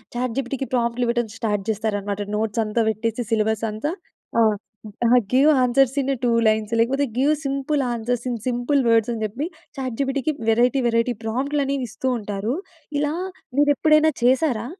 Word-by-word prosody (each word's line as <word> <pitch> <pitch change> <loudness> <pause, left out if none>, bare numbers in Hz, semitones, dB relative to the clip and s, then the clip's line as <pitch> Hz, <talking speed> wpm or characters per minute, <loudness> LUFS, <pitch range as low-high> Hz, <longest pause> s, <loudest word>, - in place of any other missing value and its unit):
చాట్‌జిపిటికి 255 +2 -2
ప్రాంప్ట్‌ట్లు 240 0 +1
ఇవ్వడం 240 -1 0
start 210 -4 -1
జేస్తారనమాట. 205 -2 -2 0.2
Notes 220 +1 0
అంతా 220 +2 0
పెట్టేసి 225 +2 -2
సిలబస్ 220 0 +1
అంతా 220 +9 -3 0.5
ఆహ్, 215 -2 +4 0.5
ఆహ్, 240 +2 +6 0.2
give 275 +4 +6
answers 255 +1 +3
in 270 - -3
a - - -1
two 245 - +3 0.2
lines 215 0 +1
లేకపోతే 270 +5 +2
give 280 +4 +3
simple 275 +1 0
answers 240 +1 -2
in 240 - -2
simple 245 +3 +1
words 230 0 +3
అని 225 - -5
జెప్పి. 240 +8 -3 0.3
చాట్‌జిపిటికి 270 +2 -1 0.2
వెరైటీ 245 +4 +3
వెరైటీ 230 +1 +1
ప్రాంప్ట్‌ట్లు 270 +6 -1
అనేవి 275 -2 -1
ఇస్తూ 245 +3 -4
ఉంటారు. 210 +3 -3 0.4
ఇలా 295 +1 0 0.4
మీరు 290 0 +5
ఎప్పుడైనా 310 +2 +4
చేసారా? 250 -2 +2
240 Hz, 155 wpm, -22 LUFS, 220-270 Hz, 0.5 s, ఆహ్